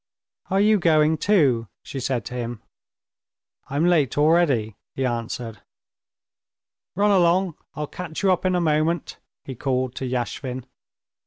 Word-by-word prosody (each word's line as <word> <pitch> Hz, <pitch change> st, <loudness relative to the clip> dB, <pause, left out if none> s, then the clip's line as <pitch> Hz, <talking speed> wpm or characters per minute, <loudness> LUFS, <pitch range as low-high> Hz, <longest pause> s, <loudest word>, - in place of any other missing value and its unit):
"Are 195 Hz, -, +2 dB
you 210 Hz, +1 st, +4 dB
going 155 Hz, -2 st, +3 dB
too?" 140 Hz, -, +3 dB, 0.2 s
she 135 Hz, -, -6 dB
said 125 Hz, -4 st, -2 dB
to -, -, -7 dB
him. 120 Hz, -2 st, -5 dB, 1.1 s
"I'm 145 Hz, +4 st, +1 dB
late 160 Hz, -8 st, +2 dB
already," 145 Hz, -, +3 dB, 0.2 s
he 135 Hz, -, -1 dB
answered. 115 Hz, -2 st, -4 dB, 1.3 s
"Run 205 Hz, +2 st, +3 dB
along! 180 Hz, -1 st, +3 dB, 0.2 s
I'll 150 Hz, -, -3 dB
catch 165 Hz, +3 st, -7 dB
you 195 Hz, -, +4 dB
up 180 Hz, -, +1 dB
in 185 Hz, -1 st, +1 dB
a -, -, +2 dB
moment," 155 Hz, +1 st, 0 dB, 0.3 s
he 135 Hz, -, -6 dB
called 130 Hz, 0 st, -1 dB
to 130 Hz, -, -3 dB
Yashvin. 125 Hz, 0 st, -3 dB
150 Hz, 140 wpm, -23 LUFS, 125-175 Hz, 1.3 s, you